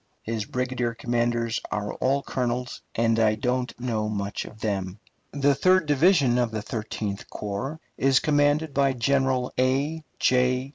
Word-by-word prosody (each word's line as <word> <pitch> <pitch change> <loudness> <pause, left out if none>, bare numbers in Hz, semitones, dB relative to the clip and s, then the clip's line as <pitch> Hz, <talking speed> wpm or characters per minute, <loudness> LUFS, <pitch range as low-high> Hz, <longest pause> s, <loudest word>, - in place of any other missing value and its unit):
His 110 -2 -3
brigade 125 -2 -2
commanders 120 -1 0
are 105 0 -3
all 135 +2 0
colonels, 125 -1 -2
and 115 0 +2
I 110 -1 +3
don't 125 +2 -2
know 110 -4 -1
much 100 -1 -3
of 110 - -12
them. 95 -3 -2 0.3
The 140 0 +2
third 185 +5 +3
division 145 -4 +4
of 120 -1 +1
the 110 -1 -4
Thirteenth 105 -3 -4
Corps 115 +10 -4 0.2
is 135 -1 +4
commanded 145 0 +2
by 140 -1 +3
General 130 0 +1
A. 140 +5 +1 0.2
J. 125 +1 +2
125 Hz, 145 wpm, -25 LUFS, 115-140 Hz, 0.3 s, division